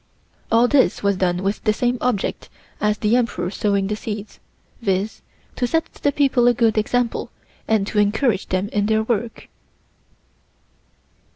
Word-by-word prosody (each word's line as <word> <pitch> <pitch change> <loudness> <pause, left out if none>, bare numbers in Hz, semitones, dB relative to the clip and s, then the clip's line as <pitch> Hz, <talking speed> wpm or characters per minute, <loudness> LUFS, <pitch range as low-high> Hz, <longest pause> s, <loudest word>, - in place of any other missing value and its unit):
All 230 +2 +5
this 270 -5 +2
was 200 -1 +2
done 180 -1 0
with 200 +2 -2
the 215 - +2
same 245 +2 0
object 240 -5 -1 0.3
as 210 0 +1
the 215 +2 +2
Emperor 210 -7 0
sowing 200 -2 0
the 210 +2 -2
seeds, 210 -1 -7 0.4
viz.: 200 0 -1 0.3
to 245 - 0
set 325 +5 -1
the 285 - 0
people 270 -4 +3
a 245 - +4
good 230 -2 +2
example 235 +2 0 0.4
and 220 -3 +2
to 210 - -1
encourage 210 +1 +1
them 185 +2 -1
in 205 -1 0
their 220 0 +2
work. 230 0 -3
215 Hz, 155 wpm, -21 LUFS, 200-245 Hz, 0.4 s, All